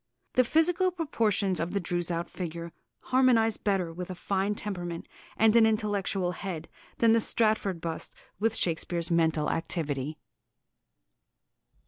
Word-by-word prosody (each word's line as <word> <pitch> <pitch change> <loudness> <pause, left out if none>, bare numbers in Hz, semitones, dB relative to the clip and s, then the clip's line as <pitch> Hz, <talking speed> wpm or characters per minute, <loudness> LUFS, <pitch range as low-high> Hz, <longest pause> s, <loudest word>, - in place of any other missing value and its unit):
"The 255 - +5
physical 335 +7 +3
proportions 220 - 0
of 170 +1 -2
the 200 - +1
Droeshout 175 -1 -1
figure 170 -1 -6 0.4
harmonise 245 -4 +4
better 190 -5 0
with 180 +2 -6
a 185 - -5
fine 195 +3 -1
temperament 175 -5 -5 0.3
and 220 0 +5
an 225 -1 +7
intellectual 205 -4 0
head 175 -3 -5 0.3
than 230 -1 +4
the 230 - +5
Stratford 215 -6 +1
bust 165 -1 -5 0.2
with 225 +1 +1
Shakespeare's 170 0 -1
mental 160 -2 +2
activity." 155 -3 -2
190 Hz, 125 wpm, -28 LUFS, 170-220 Hz, 0.4 s, an